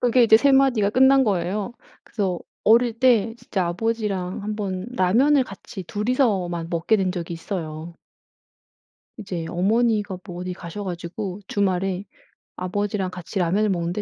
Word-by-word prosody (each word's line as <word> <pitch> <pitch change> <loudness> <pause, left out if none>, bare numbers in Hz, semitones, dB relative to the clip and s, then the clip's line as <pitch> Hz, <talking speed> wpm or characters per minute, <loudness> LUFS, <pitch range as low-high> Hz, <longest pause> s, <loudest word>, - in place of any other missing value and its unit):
그게 245 0 +4
이제 220 -1 +7
3 280 +3 +3
마디가 250 -7 +4
끝난 265 +2 +5
거예요. 195 +2 -1 0.3
그래서 190 -5 -2 0.3
어릴 230 +1 +4
때 230 -4 +3
진짜 185 -6 -2
아버지랑 195 -2 -2
1 210 0 -3
번 190 -2 -3
라면을 255 +10 +4
같이 195 -2 -9
2 210 +6 -4
이서만 190 -10 +1
먹게 170 +6 +2
된 190 -3 0
적이 170 -2 -5
있어요. 165 -2 -6 1.2
이제 185 -6 -5
어머니가 210 +1 +1
뭐 180 -3 -7
어디 180 0 -4
가셔 180 +3 -7
가지고 180 +2 -5
주말에 190 -1 0 0.5
아버지랑 190 +1 -2
같이 185 +2 -5
라면을 195 +5 +2
먹는데 175 +2 -1
195 Hz, 300 characters per minute, -23 LUFS, 180-225 Hz, 1.2 s, 이제